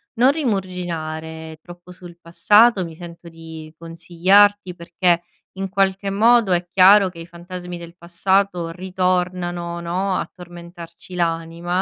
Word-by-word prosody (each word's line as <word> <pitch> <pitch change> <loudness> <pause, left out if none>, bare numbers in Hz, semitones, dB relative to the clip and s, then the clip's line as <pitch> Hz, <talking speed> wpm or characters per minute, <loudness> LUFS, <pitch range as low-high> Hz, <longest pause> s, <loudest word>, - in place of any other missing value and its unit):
Non 250 +4 +4
rimuginare 165 - -4
troppo 175 +1 -14
sul 175 -1 -13
passato, 205 +5 +3
mi 165 -2 -9
sento 170 0 -11
di 160 -1 -11
consigliarti, 180 +4 +2
perché 170 0 0 0.3
in 195 0 -5
qualche 195 0 0
modo, 225 0 +3
è 175 0 -1
chiaro, 195 +2 +6
che 175 -2 -14
i 165 - -8
fantasmi 175 +1 -9
del 170 0 -12
passato 180 0 -1
ritornano, 180 -1 -2
no, 185 +3 -2
a - - -3
tormentarci 175 0 -12
l'anima, 170 +1 -2
175 Hz, 125 wpm, -20 LUFS, 170-190 Hz, 0.3 s, chiaro